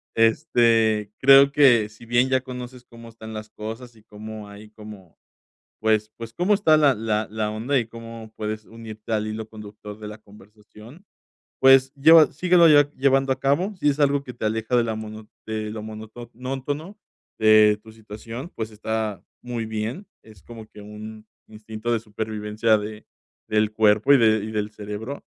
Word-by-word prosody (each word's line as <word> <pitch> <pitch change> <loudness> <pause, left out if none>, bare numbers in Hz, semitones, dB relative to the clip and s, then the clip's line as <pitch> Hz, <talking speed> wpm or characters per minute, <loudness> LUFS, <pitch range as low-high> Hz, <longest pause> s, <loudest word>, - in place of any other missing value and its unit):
este, 115 -4 +2
creo 135 +1 +7
que 125 -7 +4
si 110 +2 -16
bien, 120 +2 +2
ya 130 0 +2
conoces 125 -1 -9
cómo 115 -1 -14
están 110 -1 -11
las 110 0 -8
cosas 115 +2 -9
y 110 - -21
cómo 110 0 -9
hay 105 +1 -13
como, 105 -5 -13 0.6
pues 110 -1 +1
pues, 115 0 -9
cómo 180 +7 +2
está 165 -6 +4
la 145 -3 +4
la 110 -1 -2
la 110 -1 -2
onda 120 +6 -1
y 115 - -4
cómo 115 -1 -10
puedes 110 0 -5
unirte 110 -1 -11
al 105 -1 0
hilo 110 0 -6
conductor 105 -1 -11
de 105 - -8
la 105 0 -10
conversación, 105 - -17 0.6
pues, 135 0 +6
lleva 160 +2 +7
síguelo 175 +2 +4
lle 145 -2 +5
llevando 135 0 +2
a 130 - -1
cabo, 155 +10 0
si 155 - -1
es 145 +1 -2
algo 140 0 +2
que 125 - -8
te 120 - -10
aleja 110 +2 -1
de 120 - +4
la 110 -1 -3
mono 110 0 -9 0.2
de 110 -1 -4
lo 110 -1 -6
monótono 125 - -7 0.4
de 110 -1 +5
tu 110 0 -15
situación, 115 +6 -9
pues, 110 -1 -5
está 110 -1 -4 0.2
muy 120 -2 -5
bien, 110 - -5 0.2
es 110 -4 -17
como 115 -2 -11
que 105 - -14
un 110 +1 -10 0.2
instinto 110 +1 -6
de 115 - 0
supervivencia 110 0 -1
de 105 +1 -8 0.4
del 110 0 +1
cuerpo 110 +4 +3
y - - +7
de 110 -3 +3
y 110 - -6
del 105 -1 -3
cerebro. 105 +6 -7
110 Hz, 175 wpm, -23 LUFS, 110-125 Hz, 0.6 s, creo